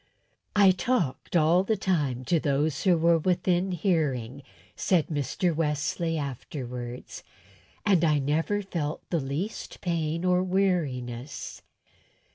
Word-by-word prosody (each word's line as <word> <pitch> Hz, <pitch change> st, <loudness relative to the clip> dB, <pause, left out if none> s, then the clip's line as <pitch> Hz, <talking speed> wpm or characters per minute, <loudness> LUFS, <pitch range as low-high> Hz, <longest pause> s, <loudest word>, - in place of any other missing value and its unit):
"I 200 Hz, -2 st, +7 dB
talked 185 Hz, -, -1 dB
all 170 Hz, +3 st, +4 dB
the 215 Hz, +2 st, 0 dB
time 145 Hz, -10 st, 0 dB
to 170 Hz, +3 st, +2 dB
those 145 Hz, +1 st, 0 dB
that 180 Hz, -3 st, +5 dB
were 165 Hz, 0 st, +4 dB
within 180 Hz, +2 st, +1 dB
hearing," 145 Hz, -, 0 dB, 0.3 s
said 175 Hz, -5 st, +1 dB
Mr. 155 Hz, +3 st, -1 dB
Wesley, 160 Hz, +2 st, -1 dB
afterwards, 125 Hz, -3 st, -6 dB, 0.6 s
"and 190 Hz, -5 st, +4 dB
I 155 Hz, -2 st, +4 dB
never 160 Hz, +9 st, 0 dB
felt 160 Hz, -5 st, -4 dB
the 170 Hz, -, +2 dB
least 145 Hz, +10 st, -4 dB
pain 165 Hz, -1 st, -1 dB
or 180 Hz, 0 st, +3 dB
weariness." 150 Hz, -9 st, -2 dB
165 Hz, 115 wpm, -27 LUFS, 140-180 Hz, 0.6 s, I